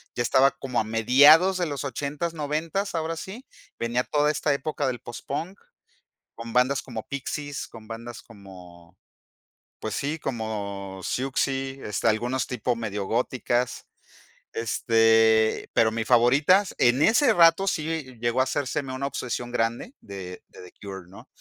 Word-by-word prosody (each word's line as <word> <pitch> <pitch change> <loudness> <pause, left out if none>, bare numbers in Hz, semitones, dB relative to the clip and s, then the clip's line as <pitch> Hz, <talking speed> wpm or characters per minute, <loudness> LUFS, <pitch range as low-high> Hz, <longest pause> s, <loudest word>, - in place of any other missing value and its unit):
ya 120 - 0
estaba 135 +3 +4
como 125 -3 -3
a - - +1
mediados 145 - +5
de 180 - 0
los 145 -5 -4
ochentas, 145 +5 -3
noventas, 160 +6 -2
ahora 165 0 -2
sí, 200 +10 -8 0.3
venía 120 +2 0
toda 150 +2 +1
esta 150 0 0
época 145 0 -2
del 125 -2 -2
postpunk, 145 - -6 0.8
con 115 0 -8
bandas 125 +3 +2
como 115 -4 -7
Pixies, 145 +1 -5
con 110 -1 -13
bandas 115 +1 -8
como, 90 -5 -15 0.8
pues 110 - -4
sí, 150 +3 -2
como 100 -6 -5
Siouxsie, 135 +3 -2
este, 105 - 0
algunos 120 +4 0
tipos 125 0 -2
medio 105 -3 -4
góticas, 125 +1 -1 0.7
este, 115 -1 +3
pero 110 -1 +3
mis 110 0 -3
favoritas 140 - +4
en 120 +3 +3
ese 230 - +5
rato 170 +1 +5
sí 155 -8 -3
llegó 120 +1 0
a 130 - +5
hacérseme 135 0 -2
una 140 +1 -2
obsesión 125 -3 -4
grande 120 - -2
de 95 -2 -9
de - - -14
The - - -25
Cure, 95 -3 -8
¿no? 95 - -14
125 Hz, 145 wpm, -25 LUFS, 115-150 Hz, 0.8 s, mediados